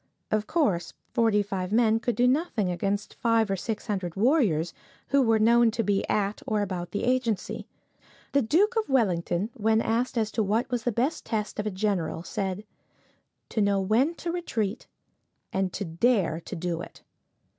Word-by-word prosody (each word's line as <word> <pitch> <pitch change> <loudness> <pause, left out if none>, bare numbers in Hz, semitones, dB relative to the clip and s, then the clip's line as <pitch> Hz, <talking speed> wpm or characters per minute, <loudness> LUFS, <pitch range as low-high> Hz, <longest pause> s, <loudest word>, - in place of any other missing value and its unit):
Of 215 0 0
course, 285 - 0 0.2
forty 220 -3 +3
five 190 -2 -4
men 225 0 +3
could 240 +1 -1
do 245 +1 +3
nothing 250 - +1
against 195 +4 -2
five 225 -3 +1
or - - +2
six 215 +3 -4
hundred 190 -6 -3
warriors, 200 - +2 0.4
who 280 0 +4
were 225 -3 +4
known 235 +2 +5
to 230 +1 -1
be 200 -1 0
at 205 0 0
or 210 -2 +1
about 180 -3 -4
the 205 - -3
agency. 250 -4 -1 0.6
The 280 - +3
Duke 365 - +2
of 445 -6 0
Wellington, 195 -5 +1
when 220 0 +2
asked 235 +3 0
as 220 -1 0
to 225 - 0
what 220 +5 +1
was 240 -2 -2
the 245 - +2
best 250 +8 -1
test 215 -2 -3
of 210 - -1
a - - +1
general, 185 -5 -1
said, 190 +2 -3 0.9
"To 220 - 0
know 200 -1 +3
when 230 - +2
to 340 - -4
retreat, 230 - -3 0.7
and 190 -1 0
to 200 - -3
dare 170 -1 +1
to - - -6
do 170 0 -3
it." - - -11
215 Hz, 175 wpm, -27 LUFS, 195-240 Hz, 0.9 s, known